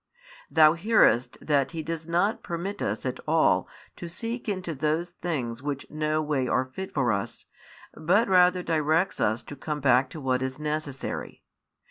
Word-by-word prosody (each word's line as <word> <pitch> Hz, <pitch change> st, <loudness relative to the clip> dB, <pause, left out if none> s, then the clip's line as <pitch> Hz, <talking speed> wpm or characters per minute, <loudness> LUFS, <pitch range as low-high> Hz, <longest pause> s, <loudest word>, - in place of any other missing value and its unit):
Thou 155 Hz, -1 st, +6 dB
hearest 170 Hz, -, +3 dB
that 145 Hz, 0 st, +1 dB
He 160 Hz, -1 st, -4 dB
does 165 Hz, 0 st, -5 dB
not 175 Hz, +7 st, +1 dB
permit 185 Hz, +4 st, -5 dB
us -, -, -2 dB
at -, -, -3 dB
all -, -, +3 dB, 0.3 s
to 170 Hz, -, -7 dB
seek 230 Hz, +6 st, -4 dB
into 185 Hz, -4 st, -3 dB
those 155 Hz, +4 st, -1 dB
things 130 Hz, -10 st, -4 dB
which 140 Hz, -1 st, -4 dB
no 155 Hz, 0 st, 0 dB
way 145 Hz, -4 st, 0 dB
are 130 Hz, -, +1 dB
fit 190 Hz, +9 st, -7 dB
for 130 Hz, -5 st, +1 dB
us, 100 Hz, -1 st, -3 dB, 0.5 s
but 185 Hz, +9 st, +2 dB
rather 180 Hz, -1 st, +4 dB
directs 160 Hz, +2 st, +1 dB
us 110 Hz, +2 st, +1 dB
to 145 Hz, -, -9 dB
come 150 Hz, +2 st, -4 dB
back 130 Hz, -1 st, +3 dB
to 155 Hz, -, -8 dB
what 130 Hz, -2 st, 0 dB
is 130 Hz, 0 st, -3 dB
necessary. 150 Hz, -3 st, -4 dB
155 Hz, 165 wpm, -26 LUFS, 135-175 Hz, 0.5 s, Thou